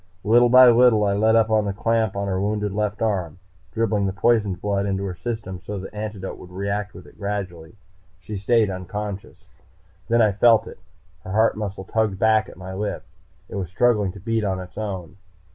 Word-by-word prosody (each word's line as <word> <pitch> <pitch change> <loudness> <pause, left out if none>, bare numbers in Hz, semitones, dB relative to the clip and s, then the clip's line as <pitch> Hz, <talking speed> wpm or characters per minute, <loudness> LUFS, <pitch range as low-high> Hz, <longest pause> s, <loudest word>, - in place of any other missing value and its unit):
Little 120 +4 +5
by 130 +1 +8
little 120 -2 +5
I 100 - +1
let 110 +2 +3
up 110 -1 +3
on 110 -1 +3
the 100 - -2
clamp 110 0 0
on 100 0 -2
her 95 -1 -1
wounded 105 0 -1
left 105 +1 -2
arm, 95 -8 -1 0.3
dribbling 105 -1 0
the - - -1
poisoned 105 -2 +1
blood 100 -1 -1
into 95 0 -2
her 95 -2 -3
system, 100 -2 -5
so 100 +4 -6
that 95 0 -7
the - - -18
antidote 105 -3 -6
could 90 - -12
react 100 +2 -3
with - - -11
it - - -18
gradually. 95 -5 -5 0.4
She 105 +3 -7
stayed 105 +1 +2
unconscious. 100 +2 -7 0.6
Then 120 +1 +2
I 110 -2 +4
felt 110 +2 +4
it. - - -11 0.4
Her 95 - -6
heart 110 +2 +3
muscle 100 -2 -5
tugged 110 -2 -1
back 110 +1 +2
at - - -14
my 95 0 -8
lift. 100 -1 -4 0.4
It - - -12
was 95 -4 -4
struggling 105 -1 +2
to 100 - -11
beat 115 +3 -1
on 95 -2 -1
its 90 -1 -10
own. 95 -4 -5
105 Hz, 205 wpm, -23 LUFS, 95-110 Hz, 0.6 s, by